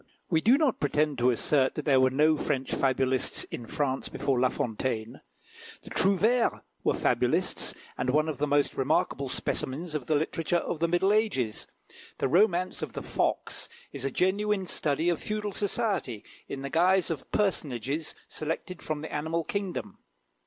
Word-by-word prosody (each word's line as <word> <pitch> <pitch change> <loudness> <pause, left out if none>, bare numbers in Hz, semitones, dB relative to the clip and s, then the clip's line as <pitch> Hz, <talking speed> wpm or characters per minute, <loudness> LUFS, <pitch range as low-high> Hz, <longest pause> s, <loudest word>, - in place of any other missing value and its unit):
We 160 -2 +3
do 240 +9 +5
not 295 -6 +1
pretend 150 -1 +1
to 125 +1 +4
assert 130 +2 +2
that 150 - -4
there 135 -4 +5
were 130 0 +5
no 150 +4 +4
French 135 -3 -2
fabulists 130 -1 +1
in 115 - -6
France 135 0 -1
before 135 -3 0
La 130 0 +4
Fontaine. 115 -1 -3 0.6
The - - -12
Trouvères 215 +6 +2 0.2
were - - +2
fabulists, - - +1 0.2
and - - 0
one 155 +4 +3
of 155 -4 -3
the 150 - +1
most 145 0 +2
remarkable 135 0 0
specimens 150 +5 -3
of 150 -5 -3
the 155 - +2
literature 165 +3 0
of 170 - -3
the 170 - +2
middle 180 +4 +3
ages, 160 - 0 0.5
the - - +1
"Romance 180 +3 +2
of - - -4
the - - -5
Fox," - - -1 0.2
is 140 - -5
a 135 - 0
genuine 195 +4 +1
study 155 -1 0
of 175 -3 +1
feudal 210 -1 -2
society, 200 - -1 0.2
in 135 - -5
the 140 - -4
guise 180 +2 +3
of 155 - -5
personages 150 - -1
selected 165 +3 -4
from 155 -1 -3
the 160 - -7
animal 160 +3 -1
kingdom. 195 +2 -4
155 Hz, 165 wpm, -28 LUFS, 135-185 Hz, 0.6 s, do